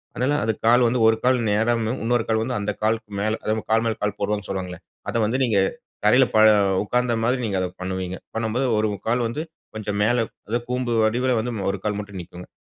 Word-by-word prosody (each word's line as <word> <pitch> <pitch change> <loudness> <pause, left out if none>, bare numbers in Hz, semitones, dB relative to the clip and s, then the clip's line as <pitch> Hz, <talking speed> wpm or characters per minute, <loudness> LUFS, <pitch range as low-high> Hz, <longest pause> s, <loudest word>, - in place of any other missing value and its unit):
அதனால 130 +4 +1
அது 110 - +1
கால் 120 +1 +6
வந்து 125 +2 0
1 110 - +5
கால் 130 0 +4
நேராம்னு 110 +1 +1
உன்னொரு 120 0 +1
கால் 110 0 +2
வந்து 125 0 -2
அந்த 100 +1 -1
காலுக்கு 110 -1 0
மேல 110 +2 0
அதா - - -2
நம்ம 110 - -4
கால் 115 +1 +4
மேல 115 -1 0
கால் 105 0 -1
போடுரோன்னு 105 0 -2
சொல்வாங்கள்ல. 90 -2 -4 0.3
அதை - - -1
வந்து 115 +4 0
நீங்க 110 -6 +2 0.5
தரையில 125 +5 +6
ப - - +6 0.4
உக்காந்த 125 +3 0
மாதிரி 125 +2 +1
நீங்க 100 -3 -1
அத 95 - 0
பண்ணுவீங்க. 95 0 -3 0.2
பண்ணம்போது, 115 +3 0
1 110 0 +2 0.2
கால் 120 +2 +2
வந்து 120 +7 -4 0.3
கொஞ்சம் 105 -1 -3
மேலே 120 +2 +2 0.3
அதா 120 +2 +1
கூம்பு 125 -1 -1
வடிவில 125 +3 +2
வந்து 120 +2 -3 0.2
1 100 - -5
கால் 105 -1 -1
மட்டும் 100 -2 -7
நிக்குங்க. 90 +1 -11
110 Hz, 210 wpm, -23 LUFS, 105-120 Hz, 0.5 s, கால்